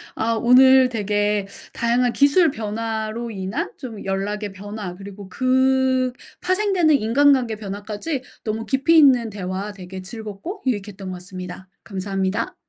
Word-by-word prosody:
아 230 +1 0
오늘 255 +3 +6
되게 205 -2 0 0.3
다양한 235 +1 +1
기술 290 +3 +4
변화로 220 +1 -4
인한 210 - -3
좀 230 -6 -8
연락의 205 +2 -2
변화 205 -1 -7
그리고 200 0 -10
그 260 +1 +2 0.3
파생되는 370 -5 +2
인간관계 255 -1 +3
변화까지 210 +7 -5 0.2
너무 220 0 -3
깊이 285 +5 +3
있는 255 -6 +5
대화 195 0 -4
되게 185 -1 -9
즐겁고 220 - -7
유익했던 205 -5 -3
것 185 - -5
같습니다. 180 +1 -9 0.2
감사합니다. 195 -1 -2
220 Hz, 305 characters per minute, -22 LUFS, 200-260 Hz, 0.3 s, 오늘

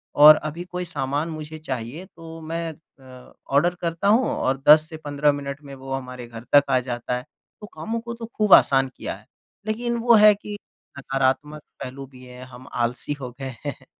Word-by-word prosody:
और 150 +1 +10
अभी 155 +3 -5
कोई 180 0 -3
सामान 145 -1 -2
मुझे 155 0 -7
चाहिए, 135 +3 -5
तो 165 -2 -12
मैं 165 +1 -4 0.3
अ, 130 -1 -15 0.2
ऑर्डर 175 +6 +3
करता 170 +3 -1
हूँ 225 +5 +4
और 135 +1 -1
10 155 +1 +8
से 160 - -8
15 145 -1 +1
मिनट 140 0 -6
में 140 -1 -10
वो 135 0 -10
हमारे 125 -2 -6
घर 115 -1 -10
तक 145 - +8
आ 130 -1 +3
जाता 125 0 -3
है, 125 - -8 0.4
तो 210 - -8
कामो 230 +1 -4
को 235 0 -7
तो 230 0 -7
खूब 210 -3 +3
आसान 135 -1 +6
किया - - -5
है। - - -18 0.4
लेकिन 235 +2 -1
वो 235 0 +4
है 210 -1 +8
कि 205 0 -8 0.4
नकारात्मक 135 +2 -1 0.2
पहलू 135 +2 -7
भी 130 -1 -16
हैं, 125 0 -11
हम 130 +1 -13
आलसी 120 +4 -2
हो 125 -2 -6
गए 130 -2 -6
हैं। 140 -2 -6
145 Hz, 195 wpm, -23 LUFS, 130-170 Hz, 0.4 s, और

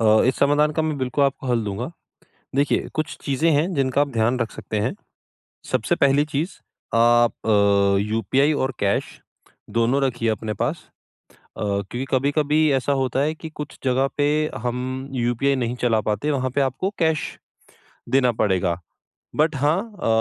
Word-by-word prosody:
अ, 110 0 +5
इस 130 - +1
समाधान 150 +2 +3
का 160 - +3
मैं 155 -2 -1
बिल्कुल 130 +2 +1
आपको 135 0 -1
हल 120 -3 +1
दूँगा। 105 +7 -4 0.7
देखिए, 140 +1 +1
कुछ 155 -1 -3
चीज़ें 145 +4 +1
हैं 160 +5 +1
जिनका 135 -1 +1
आप 145 - 0
ध्यान 115 +3 +1
रख 115 -2 -1
सकते 110 - -4
हैं। 105 - -1 0.8
सबसे 120 -4 +1
पहली 140 +2 +3
चीज़ 155 +4 -3 0.4
आप 120 0 +5
अ, 100 -2 +4
यूपीआई 115 +8 +1
और 130 -1 -1
कैश 100 -1 -1 0.6
दोनों 120 +4 +2
रखिए 120 -3 0
अपने 110 0 -2
पास - - -3 0.7
अ, - - -5
क्योंकि 100 +5 -2
कभी-कभी 145 +3 +1
ऐसा 135 +1 +1
होता 130 +1 0
है 155 +2 +1
कि 160 0 -8
कुछ 150 -1 -7
जगह 130 +1 +2
पे 145 - +2 0.4
हम 120 0 -1 0.4
यूपीआई 120 +3 +1
नहीं 120 +1 -1
चला 115 -2 +3
पाते, 105 +8 0
वहाँ 130 -3 0
पे 140 - +3
आपको 135 +8 0
कैश 160 -2 +2 0.9
देना 130 -2 +3
पड़ेगा। 90 -4 +1 0.6
बट 155 0 +2
हाँ 145 +4 +2 0.3
अ, - - 0
130 Hz, 165 wpm, -23 LUFS, 115-145 Hz, 0.9 s, अ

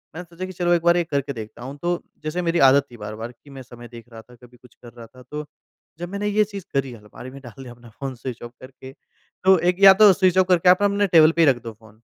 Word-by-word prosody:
मैंने 180 - -7
सोचा 170 +2 -9
कि 185 - -9
चलो, 175 0 0
एक 170 - +1
बार 170 0 +3
ये 175 - +1
करके 140 -3 -4
देखता 110 +1 -10
हूँ। 135 +3 -9
तो 175 0 -2 0.2
जैसे 155 +4 -3
मेरी 170 0 -1
आदत 140 +1 +3
थी 120 - -13
बार-बार 110 +2 -8
कि 135 +4 -22
मैं 135 -1 -11
समय 120 -1 -13
देख 120 0 -14
रहा 115 0 -11
था, 125 +2 -20
कभी 125 +1 -19
कुछ 125 0 -22
कर 120 - -12
रहा 120 -1 -12
था, 125 +3 -18
तो 150 +4 -8 0.5
जब 175 0 -6
मैंने 200 +1 -4
ये 210 +1 +2
चीज़ 200 -3 -9
करी, 135 -2 -2
अलमारी 110 +3 -13
में 140 - -12
डाल 130 +1 -13
दिया 120 -2 -11
अपना 120 -1 -17
फ़ोन 135 -2 -6
स्विच 125 0 -8
ऑफ़ 120 - -9
करके, 130 0 -13 0.5
तो 190 0 +5
एक 180 +2 0
या 195 -1 +10
तो 205 0 +6
स्विच 185 -1 +1
ऑफ़ 185 - +3
करके, 180 -1 +3
आप 180 +2 +4
ना, 205 - +4
अपने 200 0 0
टेबल 165 -3 +5
पे 170 - -1
ही - - +1
रख 120 -2 -1
दो 115 -1 -8
फ़ोन। 110 0 -22
140 Hz, 285 wpm, -21 LUFS, 120-175 Hz, 0.5 s, या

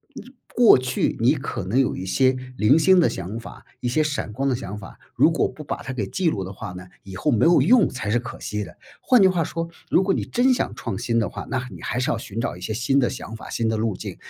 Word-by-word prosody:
你 250 - -10 0.3
过 240 - +7
去 130 0 -1
你 120 +5 +4
可 130 - -4
能 110 +8 +1
有 135 - +1
一 95 - -5
些 130 +8 +2 0.2
零 125 +7 +5
星 185 +3 +5
的 170 - +4
想 95 +5 -5
法、 115 - -12
一 125 - -3
些 155 +6 +2
闪 145 -7 -3
光 135 +6 -2
的 130 - +1
想 105 -3 -6
法， 100 -2 -11 0.2
如 - - +5
果 - - +1
不 - - -10
把 - - -5
它 135 - -6
给 115 -6 -2
记 170 - 0
录 100 -11 -3
的 95 +2 -7
话 90 - -7
呢， 90 0 -9 0.2
以 95 -1 -10
后 145 +11 0
没 115 - +2
有 170 +1 +6
用 245 -2 +5
才 105 -5 -4
是 120 - +2
可 125 +1 -8
惜 105 0 -3
的。 - - -12 0.2
换 250 - +4
句 195 - +7
话 180 -3 +1
说， 165 +2 -4 0.2
如 185 - +4
果 195 0 +1
你 - - -1
真 255 +2 +2
想 - - -1
创 120 - -4
新 120 -1 -1
的 115 - +2
话， - - -7
那 130 -1 -2
你 - - -10
还 125 - -2
是 125 - 0
要 - - -1
寻 110 -1 -7
找 115 - -2
一 90 - -12
些 100 - -4
新 125 +5 +1
的 125 - +2
想 115 - -7
法， 110 - -10
新 115 - -1
的 110 0 0
路 110 -3 -1
径。 - - -7
125 Hz, 300 characters per minute, -23 LUFS, 105-155 Hz, 0.3 s, 过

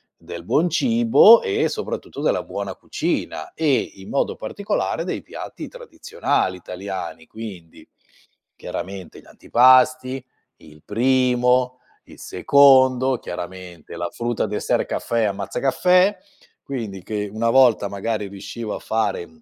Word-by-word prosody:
del - - -10
buon 170 +4 +2
cibo 230 +3 +6
e 435 0 0
soprattutto 440 - -5
della - - +1
buona - - -5
cucina, 360 - -4
e 145 -5 +2 0.2
in 95 0 -12
modo 140 - 0
particolare 205 +1 -3
dei - - -4
piatti - - -8
tradizionali 485 - -3
italiani, 90 -2 -7
quindi: 95 -7 -10 0.7
chiaramente 95 -2 -7
gli - - -25
antipasti, 130 +1 +3 0.3
il 75 -1 -17
primo, 125 +1 +2 0.3
il - - -16
secondo, 130 -2 +4
chiaramente 90 -2 -8
la 85 0 -3
frutta, 120 0 -2
dessert, - - -1
caffè 115 -1 -2
e - - +2
ammazzacaffè, 140 - +2 0.5
quindi 110 -9 -6
che 105 0 -3
una 115 +2 0
volta 120 -5 +4
magari 105 +1 -3
riuscivo 105 +3 -7
a - - -6
fare, 110 -5 -2
mhmm, 80 -1 -23
120 Hz, 125 wpm, -21 LUFS, 100-135 Hz, 0.7 s, cibo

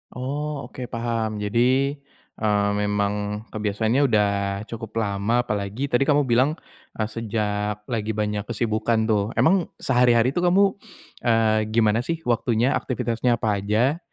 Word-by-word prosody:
Oh, 145 +3 -3
oke, 125 -1 -6
paham. 115 -2 -2
Jadi, 120 +6 +2 0.5
eee, 105 -1 +2
memang 105 0 -1
kebiasaannya 110 +4 0
udah 105 -4 +3 0.4
cukup 115 -1 -8
lama. 100 +4 0
Apalagi 105 +6 -3
tadi 130 +3 +2
kamu 145 -1 +4
bilang, 130 +4 +2 0.4
eee, 110 - -1
sejak 105 -2 -2
lagi 110 -2 -2
banyak 105 -1 -2
kesibukan 110 0 0
tuh. 110 0 0
Emang 175 +1 +3 0.2
sehari-hari 125 -1 +4
itu 160 - -1
kamu, 180 +3 +4 0.6
eee, 110 -2 +3 0.2
gimana 110 -1 +3
sih 165 +6 -3
waktunya, 120 +1 +1
aktivitasnya 120 -3 0
apa 105 -3 -1
aja? 115 +10 +1
115 Hz, 130 wpm, -23 LUFS, 105-125 Hz, 0.6 s, kamu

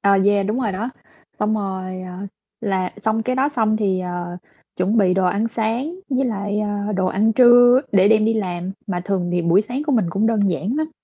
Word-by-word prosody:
Ờ, 200 - +2
yeah, 200 -1 +2
đúng 220 +5 -1
rồi 220 -5 -1
đó. 220 +7 -4 0.5
Xong 210 +1 0
rồi, 190 -3 -4
ờ, 185 +2 -7 0.3
là 190 -4 -1
xong 220 +1 +1
cái 255 +3 -2
đó 270 +2 +2
xong 220 -6 0
thì, 195 -4 0
ờ, 175 -1 -5 0.4
chuẩn 190 +5 0
bị 185 -3 +3
đồ 190 0 +1
ăn 205 +5 0
sáng, 230 +7 -2 0.2
với 265 0 +1
lại, 205 -2 -2
ờ, 205 0 -2
đồ 190 -2 0
ăn 210 +4 +1
trưa 245 +1 +6
để 195 0 +5
đem 215 -1 +4
đi 225 +1 +1
làm, 180 -3 -3
mà 180 -4 -3
thường 185 -3 -1
thì 175 0 0
buổi 170 +4 +3
sáng 245 +6 -4
của 295 - +1
mình 220 -7 +2
cũng 200 +5 0
đơn 210 -4 +2
giản 190 - -2
lắm. 310 +1 -2
205 Hz, 225 wpm, -20 LUFS, 185-225 Hz, 0.5 s, trưa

